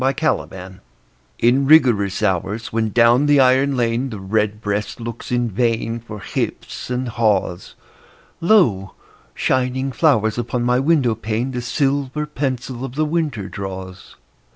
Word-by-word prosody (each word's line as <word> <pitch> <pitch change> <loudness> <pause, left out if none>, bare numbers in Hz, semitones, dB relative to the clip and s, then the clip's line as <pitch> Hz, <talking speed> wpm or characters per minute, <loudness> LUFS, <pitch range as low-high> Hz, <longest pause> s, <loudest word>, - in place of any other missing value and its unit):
XVII—WINTER 110 - -2 0.6
In 130 +3 +2
rigorous 115 -10 +4
hours, 105 +3 -1
when 110 -1 0
down 120 +5 +4
the 145 -1 +5
iron 135 +1 +3
lane 120 +2 0
The 110 -4 -7
redbreast 105 +2 -2
looks 115 +1 -7
in 120 -1 +1
vain 115 +1 -1
For 110 -2 -9
hips - - -4
and 125 0 -2
haws, 105 -6 -1 0.6
Lo, 165 - +2 0.4
shining 130 +1 0
flowers 120 -7 +2
upon 120 +1 -2
my 125 +1 +2
window 135 -4 +2
pane 115 +3 -3
The 125 -1 -3
silver 140 +3 -1
pencil 130 -4 -4
of 135 -1 -6
the 155 +1 +1
winter 150 - -2
draws. 95 -2 -8
120 Hz, 130 wpm, -20 LUFS, 105-135 Hz, 0.6 s, the